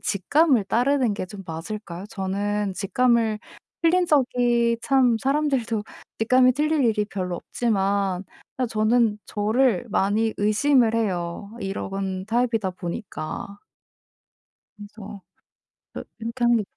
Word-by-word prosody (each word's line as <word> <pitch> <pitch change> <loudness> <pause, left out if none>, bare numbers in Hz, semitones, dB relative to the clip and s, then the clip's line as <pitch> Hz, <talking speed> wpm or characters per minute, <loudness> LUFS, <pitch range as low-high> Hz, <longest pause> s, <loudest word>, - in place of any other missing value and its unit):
직감을 255 - +2
따르는 245 +2 +1
게 190 - -4
좀 195 +1 -10
맞을까요? 175 +2 -6
저는 200 0 -2
직감을 225 +2 +1 0.4
틀린 355 +2 +4
적이 245 -5 +2
참 255 -4 +3
사람들도 260 -5 0 0.3
직감이 255 +3 +4
틀릴 300 +1 +1
일이 215 -2 +2
별로 185 -4 -4
없지만 195 -4 -1 0.3
그냥 255 -2 -1
저는 220 0 +2
저를 220 +1 +1
많이 215 +3 +1
의심을 225 +3 +3
해요 190 -3 -2
이러건 195 -1 -4
타입이다 225 -4 0
보니까. 185 +1 -6 1.2
그래서 205 -1 -10 0.7
저 - - -6 0.2
이렇게 230 +2 -4
하는 240 -1 +5
게 215 - -1
220 Hz, 255 characters per minute, -24 LUFS, 195-245 Hz, 1.2 s, 하는